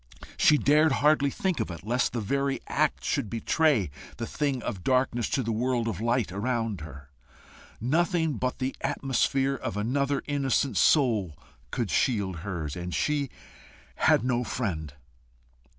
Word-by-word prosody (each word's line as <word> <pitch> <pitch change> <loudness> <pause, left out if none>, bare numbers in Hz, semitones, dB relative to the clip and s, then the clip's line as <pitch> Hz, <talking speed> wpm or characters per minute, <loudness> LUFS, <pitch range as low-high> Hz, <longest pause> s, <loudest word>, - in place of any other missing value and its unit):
She 150 - +5
dared 150 +1 +4
hardly 145 0 +3
think 185 +5 -1
of - - -1
it, 85 +1 -8
lest 125 +3 +1
the 120 - -1
very 140 +5 0
act - - 0
should 105 - -1
betray 115 - +1 0.3
the 115 - -3
thing 140 -1 -2
of 100 -7 -4
darkness 125 -3 +1
to 135 - 0
the 115 - -2
world 120 +1 0
of 105 -3 -3
light 120 -3 +1
around 115 -2 -2
her. 70 -3 -10 0.7
Nothing 160 +3 +1
but 125 +3 -2
the 130 0 -2
atmosphere 135 -1 +1
of 120 -6 -4
another 140 +6 0
innocent 140 -2 0
soul 110 - +3 0.3
could 110 - -2
shield 100 -9 +1
hers, 85 -5 -4
and 90 0 -4
she 145 -3 0 0.7
had - - +4
no 125 -1 +1
friend. 80 - -3
125 Hz, 150 wpm, -27 LUFS, 105-140 Hz, 0.7 s, She